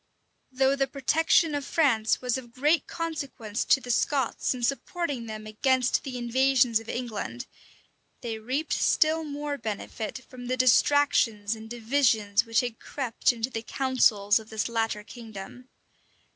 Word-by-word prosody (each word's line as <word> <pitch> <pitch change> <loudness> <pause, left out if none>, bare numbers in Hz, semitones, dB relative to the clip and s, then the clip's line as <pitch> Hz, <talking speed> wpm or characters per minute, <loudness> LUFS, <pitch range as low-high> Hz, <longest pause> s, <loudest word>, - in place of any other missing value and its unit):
Though 265 +1 +2
the 270 -1 0
protection 310 +4 +2
of 290 -1 -2
France 255 -8 +1
was 250 -2 0
of 240 -3 -7
great 300 +4 +2
consequence 280 -9 -4
to - - +4
the 250 -2 -4
Scots 265 +1 0
in 250 -2 -3
supporting 275 0 -2
them 215 -1 -7
against 255 +4 +1
the 260 -2 -5
invasions 245 -1 +3
of 225 - -12
England, 240 +1 -4 0.8
they 225 -3 -4
reaped 260 +8 -2
still 315 +1 +2
more 290 -1 -4
benefit 220 +3 -5
from 245 -1 -10
the 255 +1 -1
distractions 250 -4 +3
and 220 0 -11
divisions 225 -3 +1
which 230 -1 +3
have 240 -2 -5
crept 260 -4 0
into 240 +1 -3
the 225 - -3
councils 225 -5 +2
of 220 0 -13
this 220 -1 -2
latter 225 -2 -1
kingdom. 225 +2 -10
250 Hz, 145 wpm, -27 LUFS, 225-275 Hz, 0.8 s, to